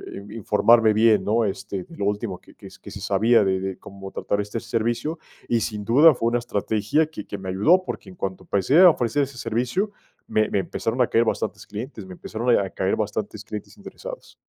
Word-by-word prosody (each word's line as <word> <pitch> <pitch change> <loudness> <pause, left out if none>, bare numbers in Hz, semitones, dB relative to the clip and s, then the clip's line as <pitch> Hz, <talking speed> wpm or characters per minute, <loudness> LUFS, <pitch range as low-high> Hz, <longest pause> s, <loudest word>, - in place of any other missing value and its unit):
eh, 100 +2 -9
informarme 115 +1 +4
bien, 110 -2 +4
¿no? 110 +3 +2
Este, 95 -1 -4
de - - -14
lo 100 - -2
último 100 -2 -2
que - - -19
que - - -12
que - - -10
se - - -8
sabía 115 -1 +3
de 95 -1 +1
de 95 -1 -4
cómo 95 0 -10
tratar 100 - -1
este 105 +3 -4
servicio, 120 +8 -2 0.3
y 120 -1 +3
sin 105 -2 -3
duda 150 +8 +7
fue 115 -1 0
una 120 +1 +1
estrategia 110 +5 0
que 150 -10 -9
que 100 - -5
me 95 -1 -7
ayudó, 160 - +4
porque - - -6
en 185 - -13
cuanto 95 - -4
empecé 100 - +2
a 185 -1 +10
ofrecer 145 -1 +1
ese 135 -2 -6
servicio, 125 - -1 0.4
me 110 0 +1
me 100 - +1
empezaron 115 +5 -2
a 125 - +4
caer 115 +1 +2
bastantes - - -3
clientes 110 -1 -7
me 95 - -10
empezaron 115 +6 -4
a 95 -1 -1
caer 95 +1 -1
bastantes 105 0 -3
clientes 105 - -8
interesados. - - -10
110 Hz, 210 wpm, -23 LUFS, 100-120 Hz, 0.4 s, a